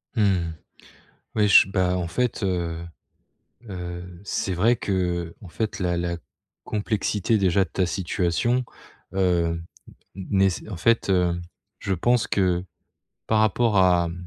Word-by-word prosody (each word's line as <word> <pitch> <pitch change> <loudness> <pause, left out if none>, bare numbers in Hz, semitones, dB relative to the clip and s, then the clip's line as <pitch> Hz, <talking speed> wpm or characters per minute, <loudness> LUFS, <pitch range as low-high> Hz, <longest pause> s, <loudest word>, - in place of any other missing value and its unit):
Mmh. 95 -6 +2 0.8
Oui, 105 -1 +3
j 100 - +7
bah, 90 -1 +1
en 85 -2 -2
fait, 120 +7 -1
heu 90 -4 -1 0.9
heu, 90 -1 -7
c'est 95 -1 -2
vrai 110 +8 +3
que, 105 - -4
heu, 85 -3 -1
en 100 - -10
fait, 105 +3 -3
la 90 -2 0
la 85 0 -2 0.5
complexité, 105 0 0
déjà, 95 -1 +3
de 90 - -9
ta 95 +3 0
situation, 95 +7 0 0.5
heu, 85 -3 +1 0.5
nés 95 0 +2 0.2
en 105 - -5
fait, 115 +5 +2
heu, 90 -2 +2 0.4
je 95 - -1
pense 120 +6 +2
que, 90 -2 +1 0.6
par 110 -1 +2
rapport 110 0 +2
à, 90 -2 +4
mmh, 90 +1 -8
95 Hz, 140 wpm, -24 LUFS, 85-105 Hz, 0.9 s, j